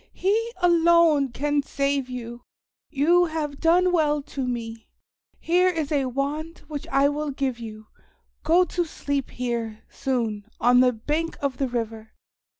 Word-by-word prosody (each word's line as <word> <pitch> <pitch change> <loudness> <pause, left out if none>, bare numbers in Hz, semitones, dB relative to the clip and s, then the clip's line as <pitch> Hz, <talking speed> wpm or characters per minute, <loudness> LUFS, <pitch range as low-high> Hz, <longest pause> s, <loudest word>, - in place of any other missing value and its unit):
He 445 +5 0
alone 335 -5 +4
can 290 +3 0
save 275 -1 -1
you. 240 -1 -7 0.5
You 335 +5 +3
have 310 -3 -4
done 355 +2 +4
well 300 -4 +1
to 270 -2 -4
me. 230 -2 -5 0.5
Here 360 +2 +3
is 320 -5 -2
a 280 -3 +1
wand 290 +5 -3
which 295 -3 -6
I 275 +1 +3
will 295 +1 -2
give 265 -3 -2
you. 215 -2 -9 0.6
Go 335 +4 +4
to 350 0 -1
sleep 285 -4 -3
here, 235 -3 -4
soon, 225 -6 -2
on 245 +1 +5
the 250 0 +5
bank 300 +8 -3
of 275 -3 -2
the 270 - 0
river. 225 -2 -5
280 Hz, 150 wpm, -24 LUFS, 245-325 Hz, 0.6 s, on